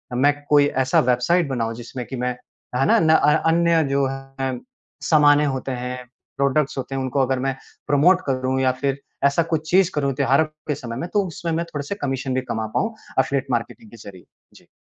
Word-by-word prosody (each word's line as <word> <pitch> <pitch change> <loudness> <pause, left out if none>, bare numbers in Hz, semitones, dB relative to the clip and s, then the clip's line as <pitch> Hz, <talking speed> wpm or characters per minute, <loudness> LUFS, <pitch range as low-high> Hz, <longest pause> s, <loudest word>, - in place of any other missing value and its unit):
मैं 140 +4 +4 0.2
कोई 145 -1 +5 0.2
ऐसा 130 - +3
वेबसाइट 155 +8 +2
बनाऊँ 115 -3 -2
जिसमें 120 +1 -7
कि 135 - -6
मैं 125 0 -1 0.4
है 135 +2 +2
ना? - - +4
न 160 - +2
अ, 150 -2 +4
अन्य 170 -1 +3
जो 140 0 +2
है 135 -1 -5 0.4
सामानें 150 -1 +5
होते 135 -1 -3
हैं, 125 0 -5 0.3
प्रोडक्ट्स 140 +1 +1
होते 135 +1 -4
हैं 135 - -1
उनको 130 +1 0
अगर 130 0 0
मैं 135 0 -1 0.3
प्रमोट 160 +6 +4
करूँ 130 -1 -1
या 130 -1 +3
फ़िर 140 -1 0 0.3
ऐसा 140 +4 +3
कुछ 155 0 -2
चीज़ 185 0 +4
करूँ 140 -2 0
त्योहारों 140 +2 +3 0.2
के 150 - 0
समय 125 -4 -7
में 170 - -4
तो 205 -2 +2
उसमें 170 0 -5
मैं 170 +1 -1
थोड़े-से 145 +6 -4
कमीशन 135 -1 -2
भी 130 - 0
कमा 110 -1 -2
पाऊँ 225 +2 0 0.3
एफ़िलिएट 140 +1 0
मार्केटिंग 115 -2 -4
के 115 - -13
ज़रिए। 100 -4 -12 0.3
जी। - - -19
135 Hz, 200 wpm, -22 LUFS, 130-150 Hz, 0.4 s, कोई